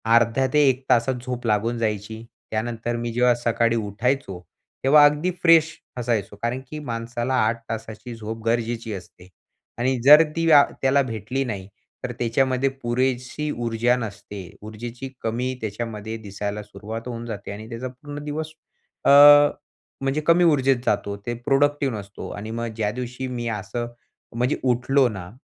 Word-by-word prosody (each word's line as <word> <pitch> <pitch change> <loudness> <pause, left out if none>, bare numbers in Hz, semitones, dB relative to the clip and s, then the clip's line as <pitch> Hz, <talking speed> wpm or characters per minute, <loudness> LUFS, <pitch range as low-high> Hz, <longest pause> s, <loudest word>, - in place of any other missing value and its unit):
अर्ध्या 115 +3 +3
ते 150 - +5
1 130 0 -1
तासात 120 +2 +3
झोप 125 -1 -4
लागून 110 +3 +1
जायची. 110 0 -3 0.3
त्यानंतर 115 +1 -2
मी 120 0 -3
जेव्हा 125 +1 +4
सकाळी 115 0 +1
उठायचो, 110 -1 -1 0.4
तेव्हा 145 +2 +7
अगदी 150 +5 +2
फ्रेश 165 -2 +6 0.3
असायचो. 115 -5 -1
कारण 120 +2 -2
की 155 - -6
माणसाला 120 -1 -3
8 115 +1 -2
तासाची 115 +2 -6
झोप 110 0 -7
गरजेची 115 -1 -1
असते 90 -1 -11 0.5
आणि 130 +2 +1
जर 150 +4 +9
ती 165 0 0
व्या 150 -3 +8 0.2
त्याला 135 +1 +4
भेटली 120 +2 -3
नाही, 100 -6 -5 0.4
तर - - -3
त्याच्यामध्ये 130 +3 +1
पुरेशी 130 +2 -2 0.2
ऊर्जा 115 +2 +2
नसते. 100 -4 -7
ऊर्जेची 115 +5 -7
कमी 120 +3 -1
त्याच्यामध्ये 110 0 -5
दिसायला 105 0 -5
सुरुवात 110 +3 -8
होऊन 120 -1 -5
जाते 105 -4 -6
आणि 105 +2 -8
त्याचा 120 +2 -5
पूर्ण 145 +3 -9
दिवस 155 +1 -4 0.5
अ, - - +5 0.9
म्हणजे 135 +3 0
कमी 170 +1 +5
ऊर्जेत 135 -5 +4
जातो. 100 0 0
ते 105 +4 -5
प्रोडक्टिव्ह 135 +1 +1
नसतो 100 0 -8
आणि 110 +2 -6
मग 115 +1 -3
ज्या 105 -2 0
दिवशी 125 +2 -5
मी 120 -2 -4
असं 110 +2 -4 0.5
म्हणजे 125 +4 0
उठलो 130 +2 +3
ना, 95 -5 -7
120 Hz, 150 wpm, -23 LUFS, 110-130 Hz, 0.9 s, जर